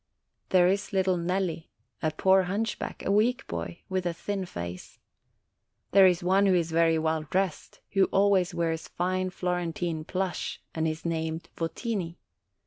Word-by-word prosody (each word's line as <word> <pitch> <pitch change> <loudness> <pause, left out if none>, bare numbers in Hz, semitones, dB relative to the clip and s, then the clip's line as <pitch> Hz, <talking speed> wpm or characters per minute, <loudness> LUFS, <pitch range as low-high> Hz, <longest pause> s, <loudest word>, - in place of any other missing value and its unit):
There 180 -1 +5
is 195 +2 0
little 190 -1 +2
Nelli, 175 -1 -2 0.3
a 155 - +2
poor 190 +4 +3
hunchback, 215 +3 -3
a - - +1
weak 240 +6 +2
boy, 170 - -5
with 185 -1 -1
a 170 - -2
thin 195 +1 -3
face. 85 - -7 0.9
There 195 -1 +8
is 180 -1 +1
one 195 +3 +4
who 190 - +4
is 170 -2 0
very 165 0 +3
well 160 0 0
dressed, 185 +1 -2
who 195 -1 +4
always 195 -2 +3
wears 165 -2 -2
fine 185 +1 -1
Flor 180 0 -1
entine 165 -2 -3
plush, 190 -1 -2
and 160 0 0
is 155 +1 -4
named 160 0 -2
Votini. 170 0 -3
180 Hz, 155 wpm, -28 LUFS, 165-190 Hz, 0.9 s, There